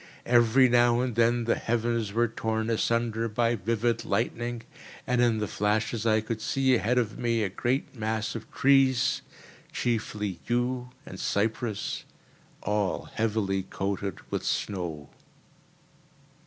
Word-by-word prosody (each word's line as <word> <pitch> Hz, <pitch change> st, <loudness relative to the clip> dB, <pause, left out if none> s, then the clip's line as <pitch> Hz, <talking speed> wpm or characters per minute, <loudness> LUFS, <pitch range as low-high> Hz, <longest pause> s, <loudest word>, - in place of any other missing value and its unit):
Every 120 Hz, +2 st, +5 dB
now 120 Hz, 0 st, +4 dB
and 125 Hz, -1 st, -1 dB
then 120 Hz, +1 st, +3 dB
the 115 Hz, -, +2 dB
heavens 115 Hz, -2 st, -1 dB
were 120 Hz, +3 st, +2 dB
torn 110 Hz, 0 st, -2 dB
asunder 115 Hz, 0 st, 0 dB
by 115 Hz, +2 st, +1 dB
vivid 115 Hz, +2 st, 0 dB
lightning, 120 Hz, +2 st, -2 dB, 0.4 s
and 125 Hz, -1 st, +1 dB
in 120 Hz, -2 st, +3 dB
the 105 Hz, -1 st, -1 dB
flashes 105 Hz, +3 st, 0 dB
I 110 Hz, 0 st, +4 dB
could 110 Hz, 0 st, -4 dB
see 135 Hz, +2 st, +2 dB
ahead 120 Hz, +2 st, +2 dB
of 115 Hz, -4 st, 0 dB
me 115 Hz, -2 st, +1 dB
a 100 Hz, -, 0 dB
great 125 Hz, +8 st, -2 dB
mass 110 Hz, 0 st, -2 dB
of 115 Hz, -, -8 dB
trees, 135 Hz, -2 st, +3 dB, 0.5 s
chiefly 105 Hz, -5 st, -2 dB
yew 125 Hz, +1 st, 0 dB, 0.2 s
and 95 Hz, -, -9 dB
cypress 110 Hz, +1 st, -1 dB, 0.6 s
all 105 Hz, -2 st, -1 dB
heavily 105 Hz, -3 st, 0 dB
coated 95 Hz, +1 st, -3 dB
with -, -, -2 dB
snow. 85 Hz, -7 st, -3 dB
115 Hz, 130 wpm, -28 LUFS, 105-120 Hz, 0.6 s, Every